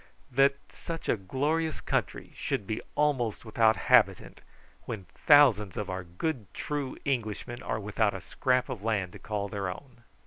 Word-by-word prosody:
"That 135 +2 +4 0.2
such 165 -1 -7
a - - +3
glorious 150 - -1
country - - -2
should - - -2
be 110 - -3
almost 130 -8 +1
without 110 0 +3
inhabitant, 110 -7 +3 0.4
when 110 -6 -5 0.2
thousands 120 - +6
of 105 -3 -3
our 95 0 -4
good 105 - -4
true 145 -3 -3
Englishmen 120 -2 -2
are 110 - -2
without 105 0 0
a 95 - -6
scrap 125 +7 +1
of 130 -7 -5
land 100 -5 -1
to - - -11
call 105 -2 -3
their 100 -2 -3
own." 120 +5 -10
115 Hz, 160 wpm, -29 LUFS, 100-135 Hz, 0.4 s, thousands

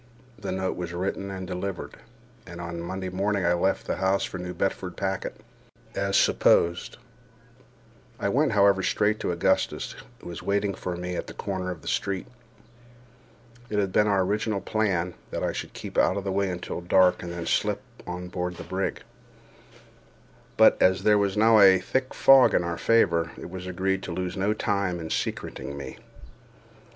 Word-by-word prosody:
The - - -4
note 95 0 -2
was 85 -1 -5
written 95 +2 -3
and 95 -1 -5
delivered, 90 0 -5 0.5
and 85 -1 -9
on 85 0 -5
a - - -4
Monday 95 +2 -4
morning 100 +1 0
I 85 - +4
left 95 +3 0
the - - -2
house 95 +1 +1
for 90 - -5
the 90 - -5
New 90 - -5
Bedford 95 -2 -2
packet, 95 -1 -3 0.5
as 100 0 +1
supposed. 85 +1 +3 1.2
I - - 0
went, 135 +5 +2
however, 100 -1 +4
straight 105 +3 +1
to - - -2
Augustus, 90 +2 0 0.3
who - - -12
was 85 - -7
waiting 100 0 0
for 90 -2 -5
me 90 0 -4
at - - -4
the - - -9
corner 95 -2 -3
of 85 -4 -6
a - - -10
street. 95 -1 -1 1.4
It 105 - -2
had 100 -2 +1
been 105 +3 +3
our 100 -2 +3
original 105 +2 -1
plan 95 -4 0 0.2
that - - -4
I - - +1
should - - -6
keep - - -4
out 95 - +3
of 100 - -3
the 95 - -2
way 100 0 0
until 90 -1 -5
dark, 90 +1 +4
and 85 - -6
then 85 -1 -5
slip - - 0 0.2
on 90 0 -5
board 90 0 -3
the - - -8
brig; 95 +1 -3 1.5
but, - - +6
as 95 +1 +4
there 105 -1 +5
was 100 0 0
now 110 +1 +6
a 95 -2 +8
thick 130 +7 -2
fog 135 -1 +6
in - - +3
our 85 -1 -3
favor, 85 -8 +2
it - - -8
was 90 0 -7
agreed 95 +1 -1
to 90 - -6
lose 90 +1 -3
no 100 +2 +1
time 100 -4 -1
in 80 -1 -6
secreting 70 - -3
me. 65 -2 -8
95 Hz, 185 wpm, -26 LUFS, 90-100 Hz, 1.5 s, a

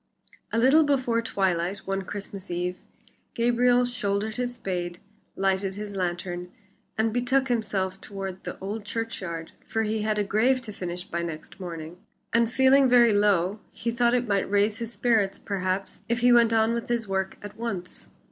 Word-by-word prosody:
A - - 0
little 270 +7 +6
before 255 -5 +1
twilight 190 -3 -1
one 195 0 -1
Christmas 200 0 -7
Eve, 180 +1 -2 0.6
Gabriel 245 +1 +3
shouldered 215 -2 -2
his 245 0 -2
spade, 175 -4 -3 0.4
lighted 195 0 0
his 205 -1 -6
lantern, 175 -1 -3 0.5
and 220 0 +1
betook 255 +2 +1
himself 195 -5 -1
toward 195 -2 -6
the - - -6
old 205 +3 -5
churchyard, 195 -7 -4
for 225 - -1
he 215 0 -1
had 215 0 0
a 210 - +2
grave 230 +6 +2
to 215 -3 -6
finish 180 -2 -5
by 170 -1 -3
next 165 0 -6
morning, 170 -2 -7 0.4
and 230 0 +3
feeling 265 +1 +5
very 240 -2 +6
low, 205 -1 +2
he 235 - -3
thought 240 +1 +3
it 245 -1 0
might 200 -2 +1
raise 205 +2 +2
his 230 -1 -4
spirits, 225 -5 +1
perhaps, 190 -1 -2
if 235 0 +1
he 245 0 +6
went 235 -1 +6
on 225 0 +3
with 235 0 -3
his 235 -3 0
work 190 0 -2
at 205 - -8
once. 195 -6 -5
210 Hz, 170 wpm, -26 LUFS, 190-235 Hz, 0.6 s, little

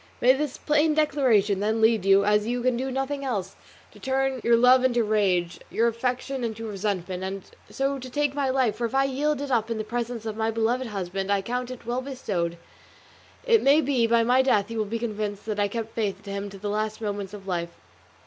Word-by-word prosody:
May 255 +2 +6
this 280 0 -3
plain 300 +1 +2
declaration, 250 -10 +2
then, 215 +2 0
lead 220 -3 +3
you, 195 0 +5
as 210 +1 +2
you 245 0 -1
can 255 -1 +2
do 260 +2 -2
nothing 270 +2 -2
else, 200 -8 -3 0.4
to - - -16
turn 265 -1 -1
your 235 0 +5
love 250 +2 +6
into 240 -2 +2
rage, 190 -5 +1
your 230 - +2
affection 250 +3 -2
into 225 -1 -4
resentment, 190 -3 -3
and 190 0 -4 0.3
so 275 0 -1
to 255 0 -8
take 290 +1 0
my 280 -2 0
life; 260 -4 +1
for 240 - -1
if 230 - -4
I 270 - +4
yield 280 +2 0
it 285 -1 -4
up 230 -2 +1
in 230 - -2
the 215 - -2
presence 235 0 -4
of 220 -1 -3
my 220 0 0
beloved 230 +3 0
husband 195 -1 -3
I 200 -1 +1
count 245 +3 -3
it 255 -2 -9
well 240 +2 -1
bestowed; 200 -11 -3 0.9
it 465 -3 +4
may 280 +3 +5
be 260 -6 +2
by 230 0 +3
my 250 +3 +4
death 215 -6 +2
he 230 - -5
will 215 -1 0
be 220 +3 -3
convinced 210 -3 -4
that 215 -1 -3
I 205 - +3
kept 225 +1 -5
my 230 - -1
faith 195 - -5
to 200 - -7
him 200 +1 -4
to 195 - -10
the 205 +2 -5
last 215 +1 -2
moment 205 -3 -4
of 195 -1 -12
life." 170 -2 -3
230 Hz, 230 wpm, -25 LUFS, 205-260 Hz, 0.9 s, May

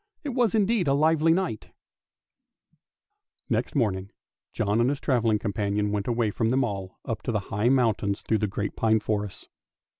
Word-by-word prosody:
It 295 - -3
was 240 -4 +1
indeed 210 -4 +2
a 135 - +3
lively 160 +2 +3
night! 165 - -1 1.8
Next - - -1
morning 100 -7 0 0.4
John 105 +1 0
and 120 - +3
his 140 0 -2
travelling 115 -7 +2
companion 105 0 -1
went 100 -1 -2
away 115 -3 +1
from 110 +2 0
them 130 +2 +2
all, 95 -5 -4
up 115 - -3
the 115 -3 -1
high 105 +4 -1
mountains 110 -6 +1
and - - -29
through 110 - +2
the 105 - 0
great 100 +1 -4
pine 110 -1 +2
forests. 105 -2 -3
115 Hz, 170 wpm, -26 LUFS, 105-140 Hz, 1.8 s, a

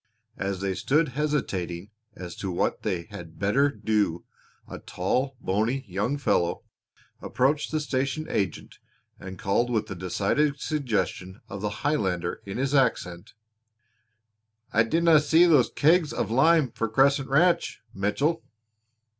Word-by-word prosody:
As 100 -1 -3
they 95 -1 -1
stood 150 - +1
hesitating 105 - -3 0.2
as 90 -2 -8
to 95 - -4
what 90 - -1
they 90 -5 -2
had 85 -5 -10
better 125 +9 +2
do 105 -10 -1 0.4
a - - -8
tall, 130 +9 -2
bony 115 +8 -1
young 105 +9 -1
fellow 85 -11 0 0.6
approached 145 +4 0
the 155 - -1
station 140 +1 -2
agent 95 - -3 0.4
and 95 0 -8
called 100 +7 0
with 110 -5 -1
a - - -1
decided 100 - 0
suggestion 105 - -2
of 100 +1 -7
the 105 +1 -4
Highlander 95 - -1
in 100 - -5
his 135 +2 -1
accent: 100 -10 0 1.4
"I 110 - +5
dinna 165 +5 +4
see 160 +4 +4
those 150 -8 +4
kegs 160 +1 +3
of 110 - -2
lime 145 +2 +4
for 115 - -3
Crescent 135 +4 +2
Ranch, 170 +5 +2
Mitchell." 140 +12 0
120 Hz, 135 wpm, -26 LUFS, 95-145 Hz, 1.4 s, I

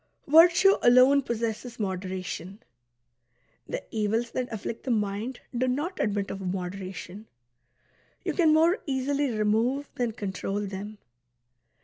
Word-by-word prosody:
Virtue 345 +6 +6
alone 255 +3 +6
possesses 235 -1 -4
moderation; 185 -1 -4 1.1
the - - -4
evils 225 +2 -1
that 250 -1 -3
afflict 220 +1 -5
the 265 - -5
mind 215 +2 -2
do 255 +2 +1
not 295 +9 -2
admit 200 -2 -1
of 195 - -6
moderation. 185 +2 -5 1.0
You - - 0
can 330 -4 +4
more 330 +6 +4
easily 275 +1 0
remove 230 +6 0
than 240 -3 -2
control 200 -2 -3
them. 205 +1 -6
225 Hz, 115 wpm, -27 LUFS, 200-265 Hz, 1.1 s, Virtue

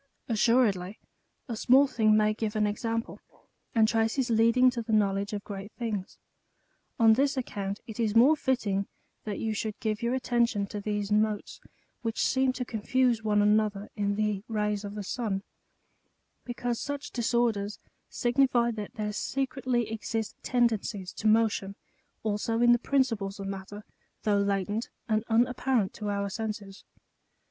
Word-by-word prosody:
Assuredly 215 -4 +2 0.5
a 235 - -3
small 260 +5 +5
thing 215 -5 +3
may 215 0 +3
give 215 0 -3
an 215 -1 +2
example, 225 +2 -2 0.6
and 220 -1 +5
traces 225 +3 +1
leading 230 +3 +5
to 240 -1 -3
the 225 0 -5
knowledge 200 -2 +1
of 205 -1 -4
great 200 0 -7
things. 215 -6 -4 0.8
On 225 -1 +7
this 275 +3 +1
account 200 -5 -3
it 220 0 -9
is 220 -2 0
more 260 +7 +7
fitting 220 -9 0 0.4
that 210 -2 -3
you 220 -1 -2
should 215 0 -4
give 215 -2 -2
your 235 +2 0
attention 235 -5 +1
to 205 +1 -6
these 205 0 -2
motes 210 0 0 0.4
which 225 -1 -1
seem 265 0 +2
to 250 0 -4
confuse 240 +1 +1
one 210 -1 +3
an 210 +1 +5
other 210 -1 -4
in 205 -2 0
the 210 -2 -1
rays 210 -2 -1
of 205 0 -6
the 210 - -4
sun; 200 -2 -2 1.0
because 245 -1 -3
such 285 0 -5
disorders 230 -4 0 0.3
signify 240 -1 +2
that 210 -2 -7
there 210 -1 -3
secretly 255 -1 -1
exist 220 0 -3
tendencies 220 -6 0
to 220 - -2
motion 215 -3 +2 0.5
also 220 +1 -1
in 240 0 +6
the 240 - +5
principles 225 -8 0
of 195 - -5
matter, 195 +2 -6 0.4
though 205 -2 +2
latent 200 +2 -1 0.2
and 215 -1 +1
unapparent 240 -2 +2
to 210 -2 -4
our 200 0 -1
senses. 205 -1 -6
220 Hz, 155 wpm, -28 LUFS, 205-240 Hz, 1.0 s, On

